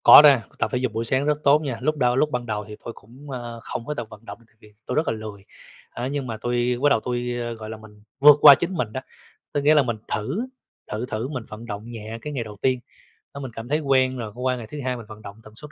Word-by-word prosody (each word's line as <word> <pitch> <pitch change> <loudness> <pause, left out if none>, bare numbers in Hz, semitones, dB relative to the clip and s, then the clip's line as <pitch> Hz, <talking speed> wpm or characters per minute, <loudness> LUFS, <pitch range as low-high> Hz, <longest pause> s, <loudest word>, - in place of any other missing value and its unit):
Có - - +11
na, 140 -6 +6 0.2
tập - - +1
thể 125 - 0
dục 125 -1 -1
buổi 115 +1 -1
sáng 130 +4 +2
rất 150 0 +2
tốt 145 +2 +6
nha. 135 -6 -3
Lúc 155 +3 0
đâu 125 -3 +2
lúc 150 +3 +3
ban 125 -2 -2
đầu 105 -2 -3
thì 105 - -8
tôi 115 - -5
cũng, 130 +8 -13
ơ, 120 -2 -6
không 115 - -5
có 150 - -2
tự 120 - -4
vận 110 +1 -13
động 100 +1 -9
tại - - -28
vì 105 0 -18
tôi 125 - -3
rất 155 +1 +1
là - - +1
lười. 105 -3 -8 0.4
Á, 120 +2 -4
nhưng 140 -1 -3
mà 115 -2 -4
tôi 120 0 0
bắt 145 - +6
đầu 140 - +4
tôi, 120 +1 -3 0.3
gọi 110 0 -7
là, 110 - -6
mình 105 -1 -16 0.2
vượt 145 +1 +9
qua 145 -2 +11
chính 175 +6 -3
mình 120 -11 -2
đó, 130 - -3 0.5
tức 145 - +1
nghĩa 150 +2 +5
là 150 -2 +5
mình 115 -3 -2
thử, 135 - -2 0.5
thử 110 +3 -2
thử 115 0 -3
mình 130 -5 -5
vận 110 +2 -9
động 105 -2 -6
nhẹ 115 -1 -7
cái 150 +3 -5
ngày 125 -4 -2
đầu 105 -2 -10
tiên. 130 -1 +2 0.6
Đó, 140 - -6
mình 135 -3 -5
cảm 115 +1 -7
thấy 150 +3 +1
quen 130 -3 +2
rồi, 110 -3 -5
qua 125 +1 -1
ngày 120 -3 -7
thứ 150 - -6
2 130 -1 -1
mình 115 -2 -9
vận 110 0 -11
động 100 -1 -9
tần 110 - -14
suất 150 +5 -8
125 Hz, 285 wpm, -24 LUFS, 110-140 Hz, 0.6 s, Có